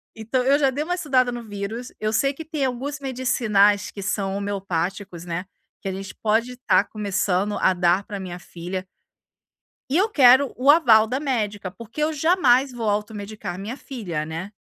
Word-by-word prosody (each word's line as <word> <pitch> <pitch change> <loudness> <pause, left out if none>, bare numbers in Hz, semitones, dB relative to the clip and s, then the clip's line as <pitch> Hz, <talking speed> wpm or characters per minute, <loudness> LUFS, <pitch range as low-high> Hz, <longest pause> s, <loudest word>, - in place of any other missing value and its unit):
então, 230 +4 -1
eu 275 +3 +4
já 275 -2 +4
dei 280 +3 -2
uma 355 +3 -1
estudada 260 -7 +2
no 240 -1 -6
vírus, 215 +3 -6
eu 215 0 -1
sei 275 +5 +1
que 320 - -8
tem 310 -3 -2
alguns 270 +3 -3
medicinais 235 -7 +2
que 200 - -8
são 195 0 -2
homeopáticos, 195 -2 -3
né, 175 +1 -4 0.4
que - - -6
a - - -1
gente 195 +1 -7
pode 230 +3 0
tá - - +5
começando 200 -1 -1
a 190 - +3
dar 180 +2 +2
pra 205 -2 -7
minha 180 -2 -6
filha. 180 +2 -6 1.0
E 285 - +2
eu 405 +4 +3
quero 265 - +6
o 265 +3 +2
aval 240 -9 +7
da 255 +4 -2
médica, 215 -9 -2
porque 230 +8 -8
eu 315 +1 0
jamais 280 -5 +3
vou 230 -3 -2
automedicar 205 -3 -4
minha 215 +6 -5
filha, 180 - -5
né. 165 +5 -6
220 Hz, 180 wpm, -23 LUFS, 195-265 Hz, 1.0 s, aval